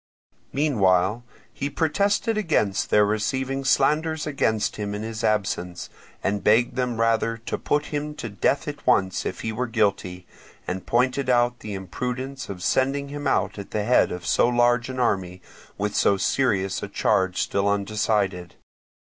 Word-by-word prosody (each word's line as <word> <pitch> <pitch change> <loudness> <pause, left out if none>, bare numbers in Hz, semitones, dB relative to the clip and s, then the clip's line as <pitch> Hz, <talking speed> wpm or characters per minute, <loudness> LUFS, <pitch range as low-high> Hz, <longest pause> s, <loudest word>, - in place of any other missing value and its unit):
Meanwhile 105 -7 +2 0.3
he 140 - -3
protested 200 - +1
against 155 - 0
their 105 0 +5
receiving 130 +6 -1
slanders 155 +3 +2
against 110 -7 0
him 105 -1 -3
in 105 - -5
his 110 0 -5
absence, 95 -4 -1 0.3
and 100 0 -1
begged 120 +3 +3
them 125 -3 -1
rather 115 0 +1
to 115 - -5
put 150 0 0
him 150 +1 -3
to 120 - -5
death 125 +8 0
at 145 0 -7
once 95 -7 +2
if 90 - -5
he 110 - -2
were 125 +3 -2
guilty, 100 -5 -1 0.4
and 95 0 -5
pointed 130 +2 +1
out 120 0 +2
the 105 -2 -6
imprudence 125 +8 -5
of 90 -3 -6
sending 140 +2 +1
him 145 0 -4
out - - 0
at 100 - -8
the 105 - -2
head 125 +4 +3
of 90 -1 -6
so 90 - +3
large 120 0 +2
an 130 0 -5
army, 95 -6 0 0.4
with 105 0 -2
so 100 - +3
serious 95 -3 0
a - - -4
charge 95 -2 +1
still 100 0 +1
undecided. 100 -3 -1
115 Hz, 160 wpm, -24 LUFS, 100-130 Hz, 0.4 s, their